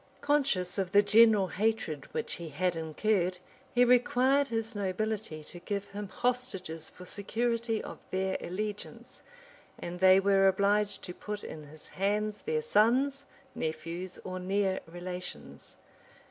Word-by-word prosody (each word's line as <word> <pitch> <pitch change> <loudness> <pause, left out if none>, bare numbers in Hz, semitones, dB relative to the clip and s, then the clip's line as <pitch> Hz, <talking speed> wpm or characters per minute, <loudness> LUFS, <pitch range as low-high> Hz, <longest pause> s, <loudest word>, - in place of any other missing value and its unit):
} - - -31
Conscious 265 -12 +1
of 190 -1 -2
the 205 0 +7
general 215 -2 +6
hatred 210 -9 -1
which - - -2
he 165 - -6
had 175 +4 0
incurred, 180 +3 0 0.3
he 245 0 +5
required 250 +3 +4
his 225 -1 -3
nobility 200 -4 -2
to 175 - -9
give 200 +2 -4
him 205 0 -6
hostages 190 -10 -2
for 180 - -13
security 230 +3 -1
of - - -8
their 190 0 -1
allegiance; 205 +3 -6 0.6
and 175 +1 -6
they 190 +1 +7
were 195 0 +4
obliged 200 +1 +2
to 180 - -6
put 210 +2 -6
in 155 -1 -8
his 155 +1 -13
hands 210 +2 -1
their 465 0 -1
sons, 275 - +3 0.3
nephews, 165 +3 -4
or 185 0 -5
near 190 +1 0
relations. 180 +2 -7
200 Hz, 140 wpm, -30 LUFS, 180-225 Hz, 0.6 s, the